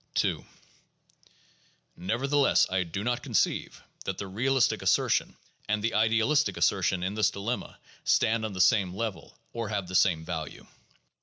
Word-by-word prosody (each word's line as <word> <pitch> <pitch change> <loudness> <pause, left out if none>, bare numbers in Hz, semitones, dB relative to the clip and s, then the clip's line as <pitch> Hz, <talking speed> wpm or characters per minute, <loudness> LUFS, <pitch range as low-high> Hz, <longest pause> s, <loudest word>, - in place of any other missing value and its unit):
II - - -2 1.5
Nevertheless, 135 +10 +2
I 95 0 +1
do 90 +3 -4
not 120 +1 -1
conceive - - -1 0.2
that - - -3
the 100 - -5
realistic 120 +6 +1
assertion - - +1 0.3
and 105 0 0
the 115 0 0
idealistic 115 - +2
assertion 90 +1 +1
in 95 +2 -2
this 105 -1 +2
dilemma 110 +5 -4 0.3
stand 110 0 +2
on 110 -2 -3
the 90 - -1
same 95 -1 +3
level, 110 -1 -5 0.2
or 115 -3 -4
have 100 -4 -2
the 90 - -8
same 90 -4 +3
value. 80 -3 -6
105 Hz, 145 wpm, -28 LUFS, 95-115 Hz, 1.5 s, same